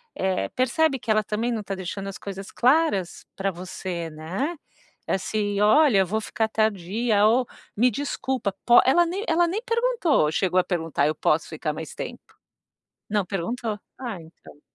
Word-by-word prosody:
eh, 190 -1 -1
percebe 270 +3 +1
que 220 - -2
ela 215 0 +3
também 220 +4 -1
não 220 -3 -2
tá 195 -1 -4
deixando 190 +1 -5
as 195 - -7
coisas 195 0 -7
claras 255 - +2
pra 195 0 -1
você, 175 -1 -5
né. 180 - -3 0.5
Assim: 205 +1 -1
"Olha, 220 0 +5
eu 190 - +4
vou 215 +4 0
ficar 220 +1 -1
tardia 215 +1 +1
ou 245 +3 +3 0.3
me 245 +4 +4
desculpa 265 -3 -2
po" 240 - +8
Ela 345 +7 +5
nem 375 +5 -3
ela 340 +1 +3
nem 405 +6 -2
perguntou 460 - +2
chegou 185 +1 +2
a - - +3
perguntar: 165 -6 -1
"Eu 155 - +1
posso 155 +2 +1
ficar 155 -1 -3
mais 155 -1 -7
tempo?" - - -6 0.9
Não 205 -2 +1
perguntou, 210 +4 -3 0.2
ah, 230 -9 -5
então. 160 -2 -17
210 Hz, 165 wpm, -25 LUFS, 185-255 Hz, 0.9 s, po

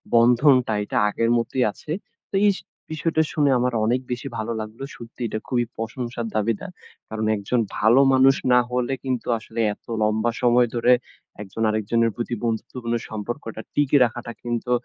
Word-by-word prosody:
বন্ধনটা 125 0 +5
এইটা 105 - -3
আগের 115 +2 0
মতোই 125 +2 0
আছে। 150 - -10 0.4
তো - - -5
এইস 200 - +3 0.3
বিষয়টা 160 0 +1
শুনে 145 -2 +3
আমার 125 0 0
অনেক 125 +3 +1
বেশি 125 +3 -3
ভালো 110 +1 -3
লাগলো। 110 +4 -8
সত্যি 115 +1 -12
এটা 110 - -3
খুবই 120 -2 +1
প্রশংসার 120 +1 -4
দাবিদার। 110 - -1 0.4
কারণ 110 0 -3
একজন 110 +5 -1 0.2
ভালো 115 +5 +5
মানুষ 135 +1 +6 0.2
না 125 - +7
হলে 125 +1 0
কিন্তু 130 -2 -2
আসলে 110 +1 -8
এত - - -21 0.2
লম্বা 110 +2 +1
সময় 120 0 +4
ধরে 120 +1 +4 0.5
একজন 105 +3 -7
আরেকজনের 110 +2 +1
প্রতি 120 0 -3
বন্ধুত্বপূর্ণ 115 +1 -2
সম্পর্কটা 110 +1 -5
টিকিয়ে 145 -2 +4
রাখাটা 120 0 -5
কিন্তু 120 0 -2
120 Hz, 160 wpm, -23 LUFS, 110-125 Hz, 0.5 s, না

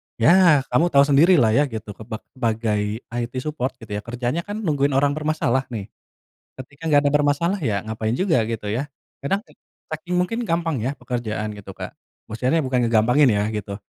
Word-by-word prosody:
Ya 170 +3 +5
kamu 175 - +3
tahu 140 0 +7
sendiri 150 +6 +5
lah 110 - +4
ya 145 +7 +4
gitu 110 -4 -7
keba 110 +2 -8
sebagai 110 -3 -1
IT 120 0 -3
support 135 -4 -3
gitu 110 - -11
ya, - - -2
kerjanya 120 +6 -2
kan 205 +1 -5
nungguin 145 -4 +1
orang 140 +1 +3
bermasalah 150 -4 0
nih, 105 -2 -5 0.7
ketika 140 +3 -11
gak 145 -1 +4
ada - - +2
bermasalah 150 +6 +1
ya 105 -8 0
ngapain 110 0 -2
juga 180 -9 +2
gitu 115 -2 -4
ya, 135 +6 -3 0.3
kadang 145 +8 +1 0.6
saking 175 +3 -4
mungkin 230 +7 -1
gampang 165 -6 0
ya 125 +5 -1
pekerjaan 110 -4 -4
gitu 100 -1 -10
Kak, - - -7 0.3
maksudnya 125 +8 0
bukan 125 -2 +1
ngegampangin 125 +5 +4
ya 105 -1 +1
gitu, 100 -1 -4
130 Hz, 175 wpm, -22 LUFS, 110-150 Hz, 0.7 s, tahu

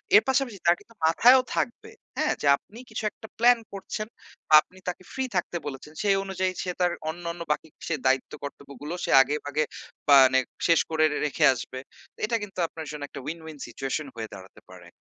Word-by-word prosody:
এর 210 - +8
পাশাপাশি 265 -5 +1
তার 170 0 +6
কিন্তু 230 - -20
মাথায়ও 245 +11 +6
থাকবে, 430 - -2 0.3
হ্যাঁ? 310 0 +2
যে - - 0
আপনি 220 +9 -15
কিছু - - -5
একটা 220 - -12
প্ল্যান 240 +1 +6
করছেন, 215 +2 -5 0.4
বা - - 0
আপনি 185 - -22
তাকে 180 +1 -6
ফ্রি 265 - -1
থাকতে 175 0 -1
বলেছেন। 145 +2 -8
সেই 200 -1 +4
অনুযায়ী 185 -1 -1
সে 180 - -2
তার 175 -1 +3 0.2
অন্যান্য 170 +1 -5
বাকি 150 - -1 0.2
সে 165 - +1
দায়িত্ব-কর্তব্যগুলো 140 +2 -3
সে - - -2
আগেভাগে 145 +2 -1 0.5
মানে 130 -2 +7 0.3
শেষ 165 -2 +5
করে 160 -1 +2
রে - - -2
রেখে 145 - +2
আসবে। 130 +1 -7 0.4
তো - - -23
এটা 230 +1 0
কিন্তু 195 -3 -8
আপনার 160 -1 -8
জন্য 150 -1 -6
একটা - - -9
উইন, 160 +3 -4
উইন 155 -2 -9
সিচুয়েশন 135 +5 -4
হয়ে 110 -1 -5
দাঁড়াতে 95 +1 -12
পারে। 90 -2 -13
165 Hz, 190 wpm, -26 LUFS, 140-200 Hz, 0.5 s, এর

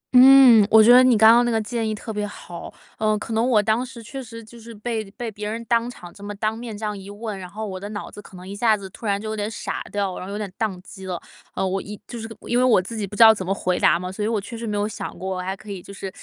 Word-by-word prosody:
嗯， 250 -4 +8
我 220 0 +7
觉 240 +3 +7
得 255 - +8
你 255 -3 +5
刚 220 +1 +8
刚 240 +1 +5
那 240 - 0
个 225 - +1
建 220 +1 -2
议 215 - -2
特 220 +1 -7
别 210 0 -2
好。 175 -4 -9 0.3
呃， 215 -1 +2
可 225 - -6
能 230 +3 +1
我 215 -4 +4
当 220 +3 +1
时 240 -2 -10
确 270 +5 -7
实 230 -2 -10
就 235 +2 -14
是 230 +1 -11
被 220 -1 -4
被 235 -1 -5
别 210 0 -5
人 230 +1 -5
当 235 +1 +1
场 175 -8 -11
这 200 - -14
么 205 0 -6
当 215 +2 -1
面 230 -2 -7
这 215 - -5
样 210 -1 -2
一 195 0 -10
问， 205 0 -6
然 180 -1 -8
后 215 +3 -6
我 190 -3 -6
的 200 +2 -7
脑 205 -1 -6
子 205 - -10
可 190 -2 -14
能 180 - -11
一 200 - -7
下 220 0 +3
子 195 -1 -8
突 220 - -8
然 200 -1 +1
就 215 - -7
有 220 - -3
点 210 0 -2
傻 225 - -5
掉 200 -2 -1
了， - - -7
然 185 - -7
后 200 - -7
有 205 - -4
点 210 - -3
宕 210 -5 -2
机 190 0 -11
了。 180 -2 -3 0.4
呃， 190 - 0
我 190 +1 -1
一 205 0 -9
就 240 - -7
是 225 0 -7
因 240 - 0
为 - - +3
我 245 -6 +5
自 190 +5 -6
己 210 -2 -3
不 205 - -9
知 230 - +7
道 220 0 +9
怎 200 -3 -5
么 185 - -3
回 185 -2 0
答 155 - +4
嘛， 180 +1 -5
所 210 +2 -4
以 - - 0
我 225 -1 0
确 215 +4 -8
实 230 0 -6
没 210 -1 -2
有 205 +1 0
想 - - -7
过， 190 0 -4
我 - - -3
还 190 +2 -4
可 215 0 -10
以 190 -3 -6
就 - - -12
是， 195 -1 -7
215 Hz, 360 characters per minute, -23 LUFS, 200-230 Hz, 0.4 s, 道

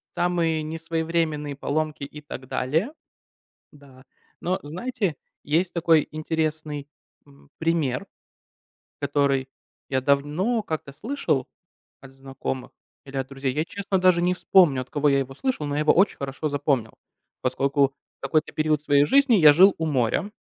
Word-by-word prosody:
самые 170 -3 +1
несвоевременные 160 -2 -2
поломки 150 +1 -2
и 150 +2 -8
так 135 -3 -9
далее. 160 - -1 0.8
Да. 135 -3 -17 0.4
Но, 185 +2 -1
знаете, 180 - -3 0.3
есть 170 +5 0
такой 165 -3 +3
интересный, 155 -2 -3 0.4
м, 140 0 -21
пример, 165 0 0 0.9
который 140 -2 +1 0.4
я 130 -1 0
давно 150 - +1
как-то 155 -6 -5
слышал 155 - -2 0.5
от 135 - -13
знакомых 135 -1 -6 0.3
или 135 0 -10
от 135 -1 -2
друзей. 135 -1 -3
Я, 150 +3 0
честно, 195 0 -2
даже 180 -1 +4
не 180 +1 +2
вспомню, 175 -7 +4
от 130 - -10
кого 150 0 +1
я 140 -1 +3
его 135 0 -4
слышал, 255 - -2
но 145 0 -3
я - - 0
его 155 - +4
очень 190 +3 +3
хорошо 140 +3 -3
запомнил, 140 -5 0 0.5
поскольку 140 +2 +1 0.3
в - - -66
какой-то 155 0 0
период 155 -1 +1
своей 145 -1 +4
жизни 275 - +4
я 155 -7 +8
жил 190 +5 +6
у 160 - -2
моря. 135 - 0
150 Hz, 145 wpm, -24 LUFS, 140-170 Hz, 0.9 s, я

